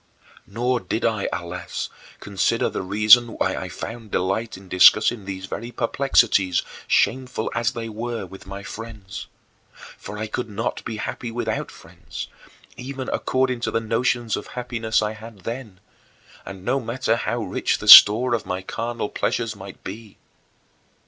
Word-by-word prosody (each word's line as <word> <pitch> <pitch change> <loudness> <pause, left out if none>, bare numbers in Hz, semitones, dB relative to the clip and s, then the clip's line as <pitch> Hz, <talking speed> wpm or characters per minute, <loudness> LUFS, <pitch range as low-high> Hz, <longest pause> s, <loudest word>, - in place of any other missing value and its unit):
Nor 120 +4 0
did 115 - -3
I, 110 -3 0
alas, 85 0 -5 0.3
consider 100 -2 0
the - - -3
reason 110 +5 +5
why - - 0
I - - -5
found 115 -1 -7
delight 95 +4 -1
in 95 0 -15
discussing 105 +4 +5
these 95 -1 -6
very 115 +5 -6
perplexities, 115 -7 +2 0.2
shameful 125 -2 +1
as 115 -2 0
they 115 -1 -5
were, 115 -1 -4
with 95 +1 -13
my 100 +1 -7
friends. 105 -3 -8 0.7
For 105 - -8
I 110 - -3
could 115 +2 -4
not 105 - -3
be 115 -2 -4
happy 120 +3 -5
without 115 -2 -3
friends, - - -10 0.5
even 130 +1 -6
according 130 -1 0
to 120 - -2
the - - 0
notions 115 +1 0
of - - -6
happiness 115 -3 -1
I 105 - -1
had 110 -2 -11
then, 115 -2 -7 0.7
and 95 -1 -9
no 135 - +1
matter 115 -1 -1
how 120 0 -2
rich 95 - -1
the - - -8
store 120 +4 +10
of 115 - 0
my 90 +1 -4
carnal 115 +2 -3
pleasures 115 0 -2
might 95 -1 -11
be. 105 +2 -9
110 Hz, 155 wpm, -23 LUFS, 100-120 Hz, 0.7 s, store